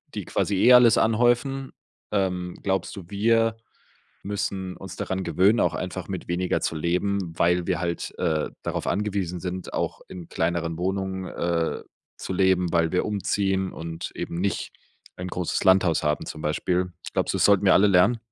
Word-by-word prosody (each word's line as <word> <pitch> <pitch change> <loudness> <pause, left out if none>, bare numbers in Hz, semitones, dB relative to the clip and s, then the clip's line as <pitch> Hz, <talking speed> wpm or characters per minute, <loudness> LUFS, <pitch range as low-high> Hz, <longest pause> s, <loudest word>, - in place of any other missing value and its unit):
die - - -3
quasi 100 - 0
eh 125 +6 +6
alles 125 -2 +7
anhäufen? 120 +4 +1 0.4
Ähm, 90 -3 -1
glaubst 95 -2 -1
du, 100 - -8
wir 115 +2 +2 0.7
müssen 95 -2 -3
uns 95 -1 -9
daran 95 0 -3
gewöhnen, 95 +7 +3
auch - - +2
einfach 90 0 -5
mit 95 -2 -5
weniger 90 +1 0
zu - - -1
leben, 90 +2 -1
weil 90 0 +2
wir 90 -3 +1
halt, 85 -1 -3
äh, 80 -4 0
darauf - - -3
angewiesen 100 -4 -1
sind, 90 +1 -5
auch - - -2
in 90 -2 -9
kleineren 85 0 -1
Wohnungen, 95 +1 -2
äh, 85 -2 -1 0.4
zu - - -5
leben, 90 -2 +2
weil 85 -1 +2
wir 90 - +1
umziehen 95 -2 0
und 80 0 -6
eben - - -4
nicht 100 +1 -2 0.4
ein 90 +1 -5
großes 90 -1 -2
Landhaus 95 -3 +4
haben 75 0 0
zum 75 - -7
Beispiel? 90 +4 -1 0.2
Glaubst - - 0
du, - - 0
es - - +2
sollten 100 -1 +4
wir 95 - +7
alle 105 - +6
lernen? 100 +5 +4
95 Hz, 170 wpm, -25 LUFS, 85-100 Hz, 0.7 s, alles